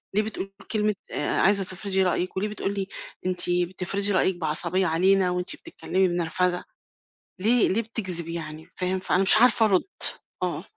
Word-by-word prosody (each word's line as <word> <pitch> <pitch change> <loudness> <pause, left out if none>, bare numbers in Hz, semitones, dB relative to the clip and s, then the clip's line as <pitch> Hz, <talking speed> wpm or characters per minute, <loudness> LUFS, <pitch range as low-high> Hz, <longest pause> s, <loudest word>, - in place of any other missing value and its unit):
ليه 210 - +4
بتقول 195 -2 -6 0.2
كلمة 210 -2 0 0.2
آآ 145 - -1
عايزة 195 0 +4
تفرضي 190 +1 -1
رأيِّك 180 +1 -1
وليه 205 - 0
بتقول 200 -1 -4
لي 195 -1 -3 0.4
أنتِ 180 -1 +1
بتفرضي 185 +3 -1
رأيِّك 190 -1 +2
بعصبية 175 +3 +2
علينا 185 +3 +2
وأنتِ 180 +9 -2
بتتكلِّمي 190 - -2
بنرفزة؟ 175 +1 0 0.8
ليه 230 +3 +4
ليه 225 +5 +1
بتكذب 185 -7 -2
يعني 160 0 -7
فاهم؟ 185 +1 -1
فأنا 185 0 +1
مش 200 - +8
عارفة 230 -1 +5
أرُد، 195 -4 +2 0.6
آه. - - -3
185 Hz, 155 wpm, -25 LUFS, 180-200 Hz, 0.8 s, مش